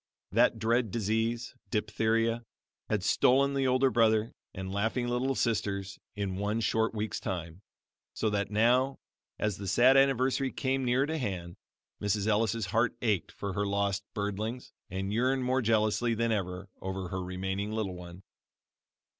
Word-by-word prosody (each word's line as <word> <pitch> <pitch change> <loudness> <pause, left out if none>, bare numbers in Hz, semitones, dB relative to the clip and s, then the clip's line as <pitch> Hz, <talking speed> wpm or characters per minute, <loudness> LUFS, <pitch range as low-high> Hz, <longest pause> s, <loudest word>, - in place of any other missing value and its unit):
That - - +4
dread 115 +1 +1
disease, 115 +3 -1 0.2
diphtheria, 115 +2 +1 0.5
had - - 0
stolen 140 +2 +4
the 135 -1 +1
older 130 +1 +3
brother 110 -1 +3 0.2
and 95 0 -6
laughing 110 +5 0
little 125 +2 0
sisters 100 -5 -1 0.2
in 100 -2 -2
one 105 +3 -1
short 110 +1 +1
week's 105 -2 -2
time, 85 -1 -5 0.5
so 110 - 0
that 100 -1 -1
now, 125 +6 +3 0.4
as 105 -3 -1
the 100 - -6
sad 125 +7 +5
anniversary 135 0 +3
came 135 0 -1
near 125 +2 +2
to 160 +1 -2
hand, 90 -8 -4 0.5
Mrs. 105 0 0
Ellis' 110 0 +1
heart 115 +6 +1
ached 105 -6 0
for 100 -1 -5
her 100 +1 -1
lost 100 0 0
birdlings 105 +4 -3 0.2
and 95 +2 -3
yearned 130 +3 +1
more 130 +1 +1
jealously 115 +1 +2
than 115 +1 0
ever 95 -2 -2
over 95 -1 -4
her 95 +1 -3
remaining 95 +3 -3
little 110 -4 -2
one. 90 +1 -10
110 Hz, 150 wpm, -30 LUFS, 100-120 Hz, 0.5 s, sad